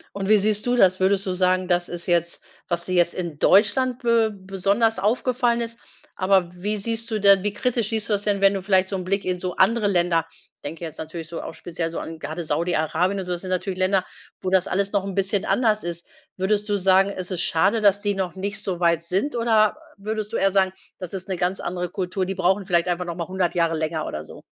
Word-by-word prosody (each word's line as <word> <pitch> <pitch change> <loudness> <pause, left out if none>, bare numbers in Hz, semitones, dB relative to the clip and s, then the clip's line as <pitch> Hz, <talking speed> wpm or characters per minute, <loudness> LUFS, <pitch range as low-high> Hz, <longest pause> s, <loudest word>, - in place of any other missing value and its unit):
Und 195 0 -3
wie 215 - +7
siehst 210 +2 +1
du 245 - +2
das? 190 -5 +4
Würdest 195 +1 +2
du 185 - -1
sagen, 185 0 +1
das 175 -1 +1
ist 175 0 -5
jetzt, 170 -1 0 0.2
was 170 -1 -2
dir 185 - -3
jetzt 175 -1 +2
in 170 -5 -5
Deutschland 245 +5 +3
be 230 -2 +3
besonders 200 +2 0
aufgefallen 240 +3 +1
ist, 230 0 -5 0.4
aber 185 -2 +2
wie 205 +4 -2
siehst 230 +2 -3
du 220 - -1
denn 200 -1 +6
wie 205 +2 -1
kritisch 235 -1 -1
siehst 220 -2 -2
du - - +2
das 205 - +1
denn, 205 -1 +1
wenn 195 0 +5
du 195 - -3
vielleicht 190 -1 +2
so 195 - -2
'n 185 - -3
Blick 195 +2 -1
in 180 -1 -1
so 180 0 -4
andere 210 +2 +3
Länder 175 -3 +1 0.4
denke 160 +4 -7
jetzt 160 - -9
natürlich 160 0 -6
so 165 +1 -6
auch - - -8
speziell 165 -1 -4
so 165 - -6
an 160 0 -7
grade 160 +2 -5
Saudi 170 +3 0
Arabien 180 +5 0
und 190 - -4
so, 180 - -5
das 175 -1 -2
sind 185 - -7
natürlich 185 0 -2
Länder, 185 0 +2 0.3
wo 185 - -3
das 190 -1 +3
alles 195 +2 -1
noch 200 -2 +1
'n 195 -1 -5
bisschen 195 +1 +1
anders 220 -4 +1
ist. 170 0 -5 0.3
Würdest 205 +2 0
du 205 - +2
sagen, 195 +1 +4
es 185 -1 -6
ist 180 -2 -1
schade, 195 +7 +2
dass 200 -1 +4
die 205 0 0
noch 190 -2 -3
nicht 200 +2 -4
so 185 -3 -3
weit 170 -2 +2
sind 190 - -1
oder, 220 -2 +3 0.2
äh, 195 - -20
würdest 215 -1 -3
du - - -1
eher 195 - +2
sagen, 190 -1 +2 0.3
das 180 -1 -7
ist 185 -1 -6
'ne 190 -2 -2
ganz 180 +2 -1
andere 180 0 -3
Kultur, 185 0 -3
die 195 - -3
brauchen 190 +1 +1
vielleicht 175 -2 +2
einfach 180 0 -1
noch 170 -1 -5
mal 170 -2 -4
100 185 -2 -1
Jahre 165 -1 +2
länger 155 0 -2
oder 75 0 -5
so? - - -12
190 Hz, 250 wpm, -23 LUFS, 175-205 Hz, 0.4 s, wie